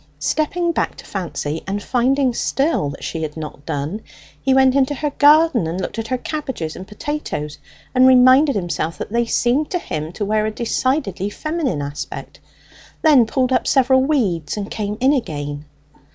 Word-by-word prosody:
Stepping 310 Hz, -, 0 dB
back -, -, -1 dB
to -, -, -12 dB
Fancy, 165 Hz, -5 st, -4 dB
and 200 Hz, +1 st, -3 dB
finding 260 Hz, +1 st, +1 dB
still 275 Hz, -, 0 dB
that 140 Hz, -, -9 dB
she 165 Hz, -, -4 dB
had 155 Hz, 0 st, -5 dB
not 150 Hz, -2 st, -8 dB
done, 150 Hz, +9 st, -3 dB, 0.4 s
he 270 Hz, -, +1 dB
went 265 Hz, 0 st, +5 dB
into 275 Hz, +1 st, +2 dB
her 295 Hz, +1 st, -2 dB
garden 290 Hz, -, +4 dB
and 170 Hz, +3 st, -3 dB
looked 190 Hz, +4 st, -4 dB
at 225 Hz, -, -4 dB
her 255 Hz, -, -1 dB
cabbages 255 Hz, -, -4 dB
and 185 Hz, -, -9 dB
potatoes, 210 Hz, -, -5 dB, 0.3 s
and 255 Hz, 0 st, +6 dB
reminded 260 Hz, +3 st, +6 dB
himself 175 Hz, -3 st, -2 dB
that -, -, -6 dB
they 235 Hz, +1 st, +1 dB
seemed 250 Hz, +6 st, +1 dB
to 360 Hz, -, 0 dB
him 155 Hz, -, -5 dB
to 205 Hz, +3 st, -4 dB
wear 215 Hz, +1 st, +1 dB
a -, -, -2 dB
decidedly 235 Hz, -, -1 dB
feminine 295 Hz, -, -2 dB
aspect; 145 Hz, +1 st, -7 dB, 0.6 s
then 280 Hz, -8 st, +6 dB
pulled 255 Hz, +2 st, 0 dB
up -, -, +1 dB
several 260 Hz, -1 st, +4 dB
weeds, 215 Hz, -, 0 dB
and 205 Hz, -1 st, -5 dB
came 210 Hz, -1 st, -3 dB
in 265 Hz, +3 st, +4 dB
again. 145 Hz, -, -3 dB
235 Hz, 175 wpm, -20 LUFS, 170-275 Hz, 0.6 s, and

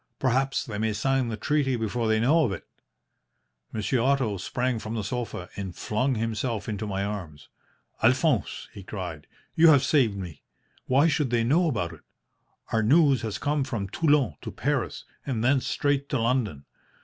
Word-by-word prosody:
Perhaps 135 Hz, +1 st, +1 dB
they 105 Hz, -6 st, -5 dB
may 110 Hz, 0 st, 0 dB
sign 135 Hz, +4 st, +1 dB
the 110 Hz, -2 st, -3 dB
treaty 140 Hz, +2 st, +1 dB
before 115 Hz, 0 st, -1 dB
they 110 Hz, 0 st, +3 dB
know 150 Hz, +8 st, +4 dB
of 115 Hz, -, +1 dB
it.' 95 Hz, -, -6 dB, 1.1 s
"Monsieur 110 Hz, +4 st, 0 dB
Otto 130 Hz, -5 st, +1 dB
sprang 125 Hz, +6 st, -1 dB
from 110 Hz, +1 st, -5 dB
the 110 Hz, -, -2 dB
sofa 115 Hz, -5 st, -4 dB
and 95 Hz, -3 st, -5 dB
flung 125 Hz, +5 st, 0 dB
himself 115 Hz, 0 st, -2 dB
into 105 Hz, -1 st, -3 dB
my 100 Hz, -1 st, -2 dB
arms. 90 Hz, -8 st, -6 dB, 0.5 s
"'Alphonse,' 130 Hz, +2 st, +2 dB
he 100 Hz, -, -9 dB
cried, 90 Hz, -6 st, -6 dB, 0.3 s
'you 165 Hz, +1 st, +6 dB
have 140 Hz, -4 st, +6 dB
saved 125 Hz, -9 st, +2 dB
me! 90 Hz, -5 st, -7 dB, 0.5 s
Why 140 Hz, +5 st, +4 dB
should 145 Hz, -3 st, +1 dB
they 120 Hz, -1 st, +2 dB
know 160 Hz, +8 st, +3 dB
about 85 Hz, -, -2 dB
it? 80 Hz, -, -14 dB, 0.7 s
Our 110 Hz, -, +2 dB
news 140 Hz, +1 st, +4 dB
has 110 Hz, -3 st, -3 dB
come 145 Hz, -1 st, 0 dB
from 115 Hz, -7 st, -4 dB
Toulon 145 Hz, -, +2 dB
to -, -, -6 dB
Paris, -, -, -2 dB, 0.2 s
and 120 Hz, -5 st, -2 dB
thence 130 Hz, +1 st, +2 dB
straight 140 Hz, -1 st, 0 dB
to 135 Hz, -, 0 dB
London. 115 Hz, -, 0 dB
115 Hz, 175 wpm, -26 LUFS, 105-135 Hz, 1.1 s, you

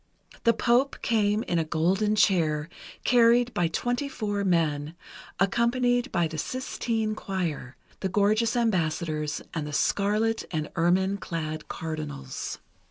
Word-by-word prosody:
The 230 Hz, -, +6 dB
Pope 245 Hz, +4 st, +2 dB
came 215 Hz, -1 st, +2 dB
in 175 Hz, -, 0 dB
a -, -, +2 dB
golden 185 Hz, +7 st, +1 dB
chair, 160 Hz, -7 st, +2 dB, 0.3 s
carried 240 Hz, 0 st, +4 dB
by 175 Hz, -, +1 dB
twenty 245 Hz, -, -1 dB
four 205 Hz, -5 st, -2 dB
men, 160 Hz, -4 st, 0 dB, 0.4 s
accompanied 245 Hz, +5 st, +2 dB
by 175 Hz, -2 st, +1 dB
the 155 Hz, 0 st, -6 dB
Sistine 225 Hz, -, -2 dB
Choir, 170 Hz, -11 st, -4 dB, 0.2 s
the 190 Hz, -, -2 dB
gorgeous 215 Hz, +4 st, +2 dB
ambassadors, 160 Hz, -8 st, 0 dB
and 155 Hz, -3 st, -3 dB
the 150 Hz, -, -6 dB
scarlet 210 Hz, +7 st, +1 dB
and 155 Hz, -3 st, -3 dB
ermine 185 Hz, +4 st, +2 dB
clad 155 Hz, -4 st, -5 dB
cardinals. 145 Hz, -4 st, -5 dB
190 Hz, 125 wpm, -27 LUFS, 160-225 Hz, 0.4 s, The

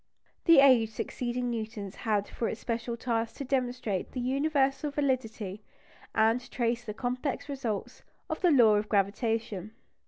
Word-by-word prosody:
The 330 Hz, -5 st, +8 dB
age 250 Hz, -5 st, +6 dB
succeeding 245 Hz, +2 st, -3 dB
Newton's 215 Hz, -4 st, -5 dB
had 210 Hz, -3 st, -1 dB
for 230 Hz, -, -2 dB
its 220 Hz, -, -5 dB
special 235 Hz, 0 st, -3 dB
task 230 Hz, -2 st, -1 dB
to 280 Hz, -, -5 dB
demonstrate 250 Hz, -7 st, -2 dB
the 255 Hz, -, -3 dB
universal 275 Hz, +2 st, +1 dB
validity, 230 Hz, -8 st, -2 dB, 0.5 s
and 225 Hz, +3 st, +2 dB
trace 235 Hz, -1 st, -1 dB
the 210 Hz, -3 st, -6 dB
complex 255 Hz, +4 st, -2 dB
results, 255 Hz, -8 st, -4 dB, 0.3 s
of 315 Hz, -, -4 dB
the 360 Hz, -, +5 dB
law 235 Hz, -8 st, +6 dB
of 210 Hz, +1 st, -2 dB
gravitation. 210 Hz, 0 st, -1 dB
235 Hz, 145 wpm, -29 LUFS, 220-265 Hz, 0.5 s, The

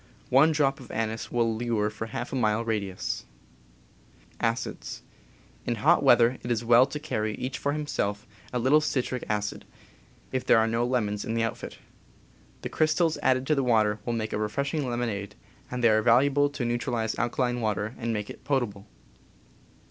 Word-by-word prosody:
One 140 Hz, +5 st, +6 dB
drop 140 Hz, -3 st, +1 dB
of 130 Hz, -, -12 dB
anise 110 Hz, 0 st, -3 dB
will 115 Hz, -2 st, +1 dB
lure 110 Hz, -2 st, 0 dB
for 110 Hz, +1 st, -6 dB
half 120 Hz, +3 st, -5 dB
a -, -, -1 dB
mile 110 Hz, -2 st, +1 dB
radius. 100 Hz, -4 st, -3 dB, 1.2 s
In -, -, -5 dB
hot -, -, +4 dB
weather 120 Hz, +1 st, +5 dB
it 120 Hz, -, -6 dB
is 120 Hz, -1 st, 0 dB
well 120 Hz, +3 st, +6 dB
to 150 Hz, +2 st, -5 dB
carry, 110 Hz, -7 st, -2 dB
each 130 Hz, +1 st, -4 dB
for 145 Hz, -, 0 dB
himself, 105 Hz, -9 st, -2 dB, 0.3 s
a 125 Hz, -, -1 dB
little 130 Hz, +6 st, +4 dB
citric 130 Hz, -4 st, -1 dB
acid, 105 Hz, -1 st, -2 dB, 0.7 s
if 130 Hz, -1 st, -1 dB
there -, -, +5 dB
are 110 Hz, -, +4 dB
no 115 Hz, +2 st, 0 dB
lemons 105 Hz, -5 st, -1 dB
in 115 Hz, -, -3 dB
the 115 Hz, -, +1 dB
outfit..., 115 Hz, -, -4 dB, 0.9 s
The -, -, -3 dB
crystals 155 Hz, +1 st, +1 dB
added 130 Hz, 0 st, +2 dB
to 140 Hz, -2 st, +2 dB
water 110 Hz, -4 st, +2 dB
make 115 Hz, -2 st, -2 dB
a -, -, -1 dB
refreshing 140 Hz, +6 st, -1 dB
lemonade, 115 Hz, -5 st, -3 dB, 0.3 s
and 125 Hz, 0 st, -4 dB
they 115 Hz, -, +6 dB
are 110 Hz, 0 st, +4 dB
val 120 Hz, +2 st, +5 dB
uable 145 Hz, +1 st, +2 dB
to 140 Hz, -4 st, -3 dB
neutralize 120 Hz, -2 st, -1 dB
alkaline 120 Hz, 0 st, 0 dB
water 105 Hz, 0 st, -1 dB
and 115 Hz, -1 st, -2 dB
make 105 Hz, -2 st, -3 dB
it -, -, -13 dB
potable. 110 Hz, -8 st, -2 dB
120 Hz, 170 wpm, -27 LUFS, 110-130 Hz, 1.2 s, One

